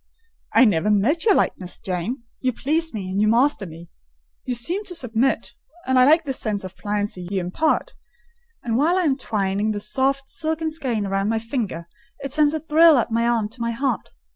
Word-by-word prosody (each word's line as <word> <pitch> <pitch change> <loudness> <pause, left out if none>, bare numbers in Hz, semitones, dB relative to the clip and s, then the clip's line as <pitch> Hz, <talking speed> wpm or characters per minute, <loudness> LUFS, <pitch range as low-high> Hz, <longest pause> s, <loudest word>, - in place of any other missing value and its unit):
"I 260 - +7
never 205 -2 +2
met 230 - +2
your 415 -4 +5
likeness. 180 -1 -1
Jane, 190 +7 -4 0.2
you 255 -1 0
please 320 +7 0
me, 200 -4 -5
and 195 +2 0
you 215 - +3
master 235 -2 +2
me—you 65 - -10
seem 345 - -2
to 360 - -4
submit, 250 -3 -1 0.3
and 260 0 +3
I 255 - +7
like 315 +3 +5
the 270 - -2
sense 210 -5 -3
of 185 0 -8
pliancy 205 -3 -3
you 195 -1 -1
impart; 310 - 0 0.7
and 230 -1 0
while 325 +7 +3
I - - +2
am 290 -5 +2
twining 205 -5 -1
the 205 - -3
soft, 270 +6 -1
silken 320 0 -2
skein 250 -9 -2
round 195 +1 0
my 225 - +1
finger, 220 -7 -3 0.3
it 275 -1 -5
sends 300 0 +3
a - - -1
thrill 320 0 +5
up 235 -1 0
my 230 +1 +1
arm 230 -3 +1
to 240 +2 -12
my 235 - 0
heart. 260 -1 -2
235 Hz, 195 wpm, -22 LUFS, 205-290 Hz, 0.7 s, I